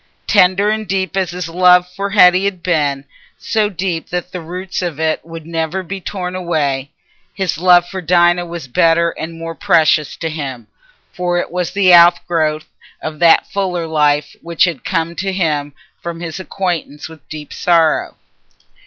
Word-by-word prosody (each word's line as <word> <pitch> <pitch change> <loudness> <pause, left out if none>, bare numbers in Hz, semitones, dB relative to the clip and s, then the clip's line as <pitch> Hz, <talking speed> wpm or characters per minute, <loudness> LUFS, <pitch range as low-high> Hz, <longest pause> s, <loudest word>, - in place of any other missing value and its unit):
Tender 195 +1 +3
and 215 -1 -3
deep 190 -1 -2
as 190 -3 0
his 180 -1 -5
love 180 +1 +4
for 195 +3 -5
Hetty 185 -1 +5
had 185 -3 -3
been—so 150 +6 -2
deep 180 -3 -4
that 180 +1 -4
the 180 - -6
roots 180 +3 -5
of 170 -5 -4
it 160 -1 -1
would 165 -1 -10
never 165 +3 -3
be 190 +2 -6
torn 180 -1 -5
away—his 155 +1 -4
love 175 0 +5
for 190 0 -6
Dinah 175 0 +2
was 170 -5 -7
better 165 +4 +2
and 165 +1 -7
more 165 0 -6
precious 155 -2 +2
to 165 - -3
him, 135 -7 -5 0.5
for 180 -1 -1
it 175 - -3
was 180 -1 -2
the 190 -2 +3
outgrowth 170 -3 +4 0.3
of 155 -1 -6
that 170 -1 +5
fuller 180 -4 -2
life 150 -2 +1
which 170 -1 0
had 170 -6 0
come 165 -2 -2
to 195 +1 -2
him 155 -6 -1 0.3
from 170 -1 -6
his 170 0 -6
acquaintance 175 -6 -4
with 160 -1 -16
deep 150 -1 -8
sorrow. 165 -3 +1
170 Hz, 160 wpm, -16 LUFS, 160-180 Hz, 0.5 s, Hetty